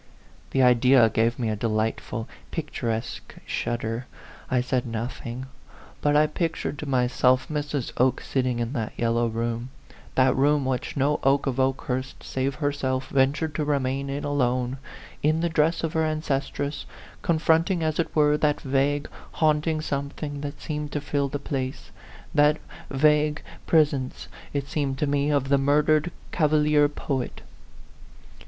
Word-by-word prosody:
The 135 Hz, -, +2 dB
idea 125 Hz, -1 st, +6 dB
gave 115 Hz, +2 st, +1 dB
me 115 Hz, -3 st, -1 dB
a 110 Hz, -, 0 dB
delightful, 110 Hz, +1 st, -2 dB, 0.2 s
picturesque 120 Hz, -8 st, -4 dB
shudder. 115 Hz, +1 st, -2 dB, 0.4 s
I 130 Hz, -, +2 dB
said 125 Hz, 0 st, 0 dB
nothing. 120 Hz, +2 st, -5 dB, 0.6 s
But 145 Hz, 0 st, +2 dB
I 150 Hz, +1 st, +6 dB
pictured 155 Hz, -2 st, -2 dB
to 150 Hz, -, -5 dB
myself 125 Hz, 0 st, +2 dB
Mrs. 145 Hz, -4 st, -2 dB
Oke 130 Hz, +1 st, +3 dB
sitting 130 Hz, -2 st, -1 dB
in 120 Hz, +2 st, -2 dB
that 110 Hz, -6 st, -3 dB
yellow 115 Hz, 0 st, +1 dB
room 115 Hz, +2 st, -2 dB, 0.5 s
that 130 Hz, -1 st, +4 dB
room 145 Hz, +1 st, +3 dB
which 130 Hz, +2 st, -2 dB
no 145 Hz, +2 st, +2 dB
Oke 135 Hz, +1 st, +3 dB
of 135 Hz, -2 st, -1 dB
Okehurst 130 Hz, 0 st, -1 dB
save 135 Hz, +1 st, -2 dB
herself 135 Hz, -3 st, -1 dB
ventured 140 Hz, +3 st, +1 dB
to 150 Hz, -, -1 dB
remain 140 Hz, -1 st, 0 dB
in 140 Hz, +1 st, -3 dB
alone, 130 Hz, -2 st, 0 dB, 0.4 s
in 155 Hz, +2 st, +2 dB
the 170 Hz, -, +1 dB
dress 160 Hz, +1 st, +2 dB
of 165 Hz, 0 st, -1 dB
her 160 Hz, -1 st, +2 dB
ancestress, 145 Hz, -2 st, -2 dB, 0.3 s
confronting, 165 Hz, +2 st, +2 dB
as 155 Hz, 0 st, -1 dB
it 170 Hz, -, -1 dB
were, 150 Hz, -1 st, +4 dB
that 150 Hz, -1 st, +1 dB
vague, 140 Hz, +2 st, +1 dB, 0.3 s
haunting 155 Hz, 0 st, +2 dB
something 145 Hz, 0 st, -4 dB
that 145 Hz, 0 st, -6 dB
seemed 150 Hz, -2 st, -4 dB
to 150 Hz, -, 0 dB
fill 140 Hz, 0 st, -1 dB
the 145 Hz, -, -2 dB
place 135 Hz, -2 st, -4 dB, 0.4 s
that 150 Hz, 0 st, +4 dB, 0.3 s
vague 150 Hz, +2 st, +2 dB, 0.2 s
pres 155 Hz, -3 st, +5 dB
70 130 Hz, -2 st, -2 dB
A -, -, -8 dB
PHANTOM -, -, -18 dB, 0.3 s
LOVER. -, -, -21 dB
ence, 140 Hz, -, +1 dB
it -, -, -19 dB
seemed 140 Hz, -2 st, -1 dB
to 150 Hz, -, +1 dB
me, 145 Hz, 0 st, +1 dB
of 140 Hz, -2 st, +1 dB
the 140 Hz, 0 st, +4 dB
murdered 150 Hz, +3 st, +3 dB, 0.2 s
cava 155 Hz, -2 st, +2 dB
lier 150 Hz, -1 st, +4 dB
poet. 135 Hz, -3 st, -3 dB
140 Hz, 160 wpm, -25 LUFS, 130-150 Hz, 0.6 s, idea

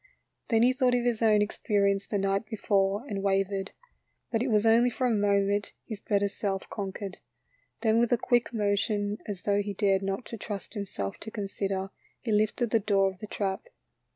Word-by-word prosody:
Then 225 Hz, -2 st, +3 dB
he 250 Hz, +1 st, +5 dB
thought 250 Hz, -1 st, +2 dB
of 245 Hz, -, +1 dB
his 240 Hz, -2 st, 0 dB
own 215 Hz, -2 st, +5 dB
experience 200 Hz, -1 st, 0 dB
the 205 Hz, -, -1 dB
night 195 Hz, +2 st, 0 dB
before, 200 Hz, 0 st, 0 dB
and 200 Hz, -6 st, -3 dB
wavered. 195 Hz, 0 st, 0 dB, 0.6 s
But 225 Hz, -2 st, +1 dB
it 255 Hz, -, 0 dB
was 215 Hz, -2 st, +2 dB
only 230 Hz, +2 st, +5 dB
for 255 Hz, +2 st, -2 dB
a 245 Hz, -, +3 dB
moment, 200 Hz, -1 st, +1 dB
his 220 Hz, -4 st, -6 dB
better 200 Hz, 0 st, +1 dB
self 195 Hz, -1 st, -3 dB
conquered. 195 Hz, -1 st, -5 dB, 0.6 s
Then 225 Hz, -1 st, +3 dB
with 235 Hz, 0 st, +2 dB
a 245 Hz, -, +4 dB
quick 240 Hz, 0 st, +1 dB
motion, 205 Hz, -1 st, 0 dB
as 200 Hz, -4 st, -5 dB
though 205 Hz, 0 st, +2 dB
he 205 Hz, 0 st, -4 dB
dared 195 Hz, -1 st, +2 dB
not 195 Hz, +4 st, -3 dB
trust 205 Hz, -2 st, -6 dB
himself 190 Hz, -, -4 dB
to 220 Hz, -, -7 dB
consider, 195 Hz, -2 st, -3 dB, 0.3 s
he 230 Hz, -, -3 dB
lifted 215 Hz, +2 st, +1 dB
the 225 Hz, -, +4 dB
door 195 Hz, -2 st, +2 dB
of 185 Hz, -, -17 dB
the 215 Hz, -, -7 dB
trap. 195 Hz, -, -3 dB
205 Hz, 185 wpm, -28 LUFS, 195-225 Hz, 0.6 s, he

